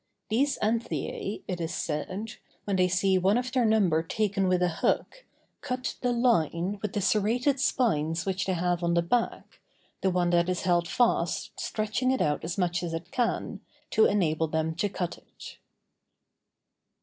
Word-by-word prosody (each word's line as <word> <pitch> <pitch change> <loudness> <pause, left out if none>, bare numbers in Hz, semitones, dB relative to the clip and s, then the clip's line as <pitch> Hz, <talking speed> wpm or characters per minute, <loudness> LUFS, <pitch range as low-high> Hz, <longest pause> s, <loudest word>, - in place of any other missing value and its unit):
These 265 +6 +1
anthiæ, 220 -2 -2
it 180 -2 -3
is 165 - -3
said, 185 +8 -4 0.3
when 200 - 0
they 185 -1 +3
see 190 +1 +2
one 195 +5 +3
of 250 +1 -2
their 255 -2 +2
number 200 -8 +3
taken 195 +2 0
with 180 -1 +2
a 175 -2 0
hook, - - 0 0.4
cut 255 0 -3
the 245 - +1
line 200 - +1
with 210 -2 -3
the 205 - -1
serrated 225 +8 +2
spines 165 - +1
which 190 -1 -1
they 190 - +1
have 175 0 0
on 170 0 +1
the 170 - +3
back, 230 +7 -2 0.4
the 190 - +2
one 180 -1 +1
that 175 0 +3
is 180 - -1
held 175 -1 +2
fast 240 +6 0
stretching 215 +4 -1
it 260 - +1
out 150 -1 0
as 170 +3 -4
much 175 -2 0
as 170 -2 -3
it 170 +2 -7
can, 240 -2 -1 0.3
to 220 - +5
enable 165 -5 +1
them 160 +1 -1
to 170 +5 -1
cut 180 -2 -4
it. - - -13
190 Hz, 175 wpm, -28 LUFS, 170-220 Hz, 0.4 s, to